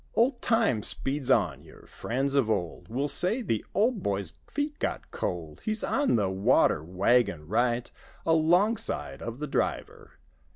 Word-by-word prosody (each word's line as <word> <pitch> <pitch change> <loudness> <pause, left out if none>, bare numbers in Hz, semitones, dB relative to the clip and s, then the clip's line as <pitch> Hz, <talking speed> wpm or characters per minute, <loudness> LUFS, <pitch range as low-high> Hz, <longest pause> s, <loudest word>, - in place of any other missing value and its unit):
" - - -31
Old 240 +1 +2
time 225 - +2
speeds 135 +4 -2
on. 90 - +2
Your 80 0 -16
friends 135 +4 -2
of 135 -6 +2
old 90 -6 -2
Will 135 +5 -1
say, 185 - +3
"The 115 - -1
old 220 +1 +2
boy's 100 - -2
feet 290 0 -3
^ot - - -2
cold! 80 -4 -4
He's 215 0 -1
on 285 - +1
the 105 -4 +2
water 95 -5 +3
wagon 90 -2 +1
right 120 +4 0 0.3
Alongside 175 +7 +1
of 115 0 -5
the 150 - -4
driver. 145 - -3
125 Hz, 155 wpm, -28 LUFS, -, 0.3 s, say